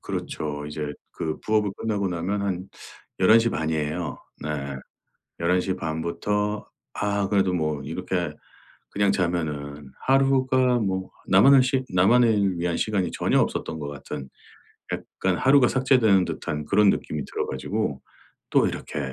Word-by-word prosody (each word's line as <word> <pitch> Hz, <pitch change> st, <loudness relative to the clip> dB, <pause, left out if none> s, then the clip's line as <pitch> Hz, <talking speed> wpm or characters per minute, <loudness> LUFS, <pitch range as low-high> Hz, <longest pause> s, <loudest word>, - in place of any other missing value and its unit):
그렇죠. 75 Hz, -1 st, -4 dB
이제 75 Hz, 0 st, -4 dB, 0.2 s
그 80 Hz, -1 st, -3 dB
부업을 105 Hz, -2 st, +1 dB
끝나고 105 Hz, -3 st, -1 dB
나면 90 Hz, +4 st, -2 dB
한 95 Hz, -1 st, -3 dB, 0.5 s
11:30 100 Hz, -6 st, +4 dB
이에요. 80 Hz, +1 st, -2 dB, 0.2 s
네. 75 Hz, -, -4 dB, 0.9 s
11:30 90 Hz, -2 st, 0 dB
부터 105 Hz, +5 st, -2 dB, 0.3 s
아 100 Hz, -1 st, 0 dB
그래도 95 Hz, -2 st, +2 dB
뭐 75 Hz, -4 st, -1 dB
이렇게 -, -, -3 dB, 0.6 s
그냥 100 Hz, -1 st, +2 dB
자면은 75 Hz, -6 st, -2 dB, 0.2 s
하루가 130 Hz, -2 st, +3 dB
뭐 95 Hz, -3 st, -2 dB, 0.2 s
나만을 130 Hz, +8 st, +7 dB
시 130 Hz, 0 st, 0 dB
나만을 100 Hz, -1 st, +4 dB
위한 85 Hz, 0 st, -1 dB
시간이 95 Hz, -5 st, 0 dB
전혀 -, -, +1 dB
없었던 80 Hz, -, -2 dB
것 75 Hz, -2 st, -5 dB
같은 70 Hz, -1 st, -7 dB, 0.7 s
약간 95 Hz, -2 st, -2 dB
하루가 135 Hz, -1 st, +5 dB
삭제되는 120 Hz, -8 st, +3 dB
듯한 75 Hz, 0 st, -4 dB
그런 105 Hz, +3 st, +4 dB
느낌이 75 Hz, -5 st, -1 dB
들어 -, -, -3 dB
가지고 70 Hz, +1 st, -3 dB, 0.5 s
또 -, -, +4 dB
이렇게 -, -, -5 dB
95 Hz, 260 characters per minute, -25 LUFS, 80-110 Hz, 0.9 s, 나만을